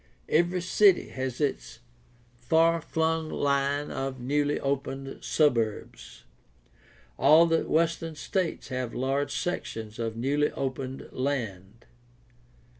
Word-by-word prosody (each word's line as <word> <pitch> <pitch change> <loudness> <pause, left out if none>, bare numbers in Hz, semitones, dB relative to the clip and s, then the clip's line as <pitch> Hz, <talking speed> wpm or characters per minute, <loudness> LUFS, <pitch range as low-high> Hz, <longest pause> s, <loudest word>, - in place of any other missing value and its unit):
Every 175 +3 +2
city 190 +1 +4
has 130 -1 -4
its 145 -3 -2 0.6
far 165 +6 +3
flung 160 0 -1
line 140 0 0
of 135 -1 -4
newly 145 +3 0
opened 135 -1 -3
suburbs. 110 - 0 1.0
All 155 +5 +7
the 165 -1 0
western 165 0 0
states 175 +1 -2
have 130 -2 -3
large 135 +2 -1
sections 115 -11 -4
of 115 -1 -3
newly 145 +5 +1
opened 130 -1 -4
land. 115 -6 -4
140 Hz, 105 wpm, -27 LUFS, 130-160 Hz, 1.0 s, All